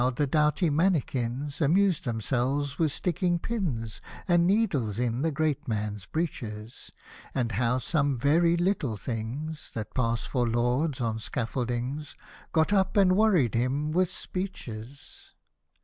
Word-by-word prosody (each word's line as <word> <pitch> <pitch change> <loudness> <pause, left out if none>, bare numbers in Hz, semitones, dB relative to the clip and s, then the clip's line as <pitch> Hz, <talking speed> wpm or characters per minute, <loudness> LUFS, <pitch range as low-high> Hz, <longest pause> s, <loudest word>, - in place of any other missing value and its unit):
the 145 - +2
doughty 150 +4 +2
mannikins 145 -4 0
Amused 175 +3 +3
themselves 130 +4 -1
with 160 -3 +2
sticking 175 +3 0
pins, 160 - -3 0.3
And 175 -1 +4
needles 160 - +1
in 120 0 0
the 165 - +2
great 150 0 -1
man's 105 -3 -3
breeches: 115 -9 -5 0.4
And 120 -3 0
how 120 +4 +1
some 140 0 +1
very 165 +7 +3
httle 170 - 0
things, 130 +8 -4
That 110 -2 -5
passed 115 -2 0
for 125 -2 0
Lords, 125 +5 +1
on 110 -2 -1
scaffoldings 125 +5 -3 0.4
Got 160 +4 +2
up, 195 0 +2
and 185 -2 +5
worried 190 - +3
him 135 +6 0
with 180 +2 +2
speeches. 140 - -7
140 Hz, 130 wpm, -28 LUFS, 120-165 Hz, 0.4 s, and